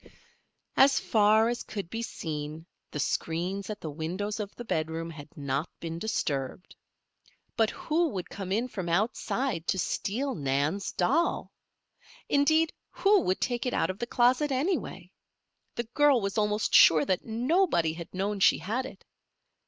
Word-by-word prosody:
As 270 0 +5
far 215 +1 +4
as 240 0 -2
could 200 -4 -6
be 225 - -3
seen 155 -6 -5 0.2
the 150 - -5
screens 180 +8 -2
at 210 - -5
the 155 - -5
windows 185 +8 -3
of 205 -2 -3
the 240 - -8
bedroom 160 -2 -2
had 150 -2 -10
not 140 +2 -2
been 165 0 -5
disturbed. 150 -7 -3 0.8
But 225 -1 +3
who 330 +2 0
would 185 -8 -5
come 190 -2 -6
in 225 +5 +1
from 190 -8 -5
outside 210 +1 -1
to - - +1
steal 250 +9 -1
Nan's 145 +6 -1
doll? 285 - +1 0.8
Indeed, 315 +3 +3 0.2
who 400 -1 +3
would 185 - 0
take 245 0 -1
it - - -1
out - - +1
of 185 - -12
the 235 - -3
closet, 255 +5 +3
anyway? 295 +9 -2 0.6
The 235 - -1
girl 290 -3 +5
was 200 -2 -3
almost 210 0 0
sure 155 -2 +7
that 185 -2 0
nobody 240 - +1
had 170 0 -8
known 200 +2 -2
she - - +5
had 230 +10 -2
it. - - -14
205 Hz, 155 wpm, -28 LUFS, 165-245 Hz, 0.8 s, sure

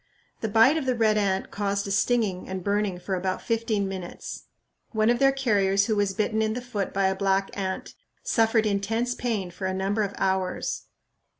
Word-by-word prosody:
The 225 - -2
bite 225 +8 +5
of 285 -4 -2
the 255 - +2
red 220 -2 +3
ant 195 -2 0
caused 200 0 -1
a - - -3
stinging 205 -4 +1
and 190 -1 -4
burning 200 -2 0
for 190 +2 -4
about 185 0 -1
fifteen 225 -3 0
minutes. 185 -2 -7 0.5
One 220 +1 +3
of 240 - +1
their 270 0 +5
carriers 200 -7 +2
who 220 - 0
was 200 -2 0
bitten 220 +1 0
in 220 0 +1
the 245 - -3
foot 240 -5 -3
by 195 0 +1
a 190 - +3
black 195 0 0
ant 190 -1 -4 0.3
suffered 225 -1 +2
intense 220 +4 0
pain 220 -8 -2
for 190 +2 -4
a 190 - -2
number 195 +3 0
of 200 -1 -2
hours. 190 -1 -1
205 Hz, 195 wpm, -26 LUFS, 190-225 Hz, 0.5 s, bite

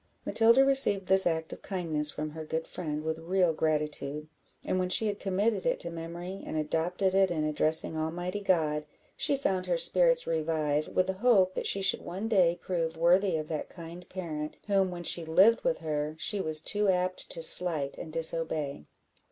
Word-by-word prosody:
Matilda 230 +4 +4
received 265 -8 +3
this 190 0 +5
act 160 -1 -2
of - - -11
kindness 160 -6 -1
from 150 +1 -4
her 160 +1 -8
good 160 +1 -4
friend 155 -4 -5
with 160 0 -3
real 175 0 +1
gratitude; 150 -1 -2 0.4
and 185 - -1
when 180 0 -1
she 220 - +1
had 205 -1 -2
committed 195 +1 -1
it - - 0
to 170 - -6
memory, 170 +3 -7
and - - -5
adopted 170 +5 -1
it 195 0 +3
in 160 -3 -2
addressing 155 +1 +3
Almighty 175 +5 -3
God, 155 -6 0 0.3
she 280 - 0
found 190 -9 -2
her - - 0
spirits - - +3
revive, 155 -2 -1
with 185 - 0
the 190 - -2
hope 190 -3 +3
that - - -3
she 195 - 0
should 190 - +2
one 190 +6 -5
day 180 -6 +2
prove 165 -3 -3
worthy 175 +1 +3
of 155 -1 -5
that 155 -2 -4
kind 170 +1 -11
parent, 155 -5 -6
whom, 195 -2 +1
when 175 -1 -7
she 170 0 0
lived 190 +8 +4
with 255 - 0
her, 150 -1 -3
she 200 +5 -1
was 155 -3 +1
too 205 +3 +1
apt 185 0 -1
to 165 - -6
slight 160 -5 +4
and 160 - -8
disobey. 160 - -2
170 Hz, 190 wpm, -28 LUFS, 155-190 Hz, 0.4 s, this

